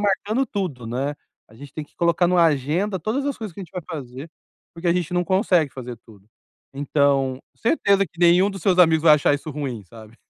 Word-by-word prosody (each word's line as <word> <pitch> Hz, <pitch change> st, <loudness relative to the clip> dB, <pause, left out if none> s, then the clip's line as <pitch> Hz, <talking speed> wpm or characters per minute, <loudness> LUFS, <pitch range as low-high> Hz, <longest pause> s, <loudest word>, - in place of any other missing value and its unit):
marcando 210 Hz, +5 st, 0 dB
tudo, 165 Hz, -, -4 dB
né, 135 Hz, +5 st, -2 dB, 0.3 s
a 110 Hz, -, -19 dB
gente 140 Hz, +3 st, -12 dB
tem 155 Hz, -, -6 dB
que -, -, -30 dB
colocar 170 Hz, +1 st, +2 dB
em 180 Hz, -, 0 dB
uma 175 Hz, -, +4 dB
agenda 165 Hz, +7 st, 0 dB
todas 225 Hz, -, -2 dB
as 285 Hz, -, -2 dB
coisas 215 Hz, -7 st, -7 dB
que -, -, -9 dB
a -, -, -5 dB
gente -, -, -21 dB
vai 180 Hz, -2 st, -5 dB
fazer, 140 Hz, -2 st, -7 dB, 0.5 s
porque 170 Hz, +1 st, -3 dB
a -, -, +4 dB
gente 180 Hz, -1 st, -2 dB
não 175 Hz, -, +2 dB
consegue 180 Hz, -5 st, +2 dB
fazer 125 Hz, -2 st, -7 dB
tudo. 100 Hz, -3 st, -18 dB, 0.5 s
Então 140 Hz, -2 st, +1 dB, 0.2 s
certeza 200 Hz, -6 st, +2 dB
que 165 Hz, -, -25 dB
nenhum 175 Hz, +3 st, +5 dB
dos 195 Hz, -1 st, -8 dB
seus 185 Hz, -2 st, +2 dB
amigos 160 Hz, -3 st, +4 dB
vai 155 Hz, -2 st, +8 dB
achar 145 Hz, -1 st, +2 dB
isso 145 Hz, +2 st, -6 dB
ruim, 135 Hz, -7 st, -5 dB
sabe. 110 Hz, +3 st, -15 dB
160 Hz, 220 wpm, -22 LUFS, 135-185 Hz, 0.5 s, vai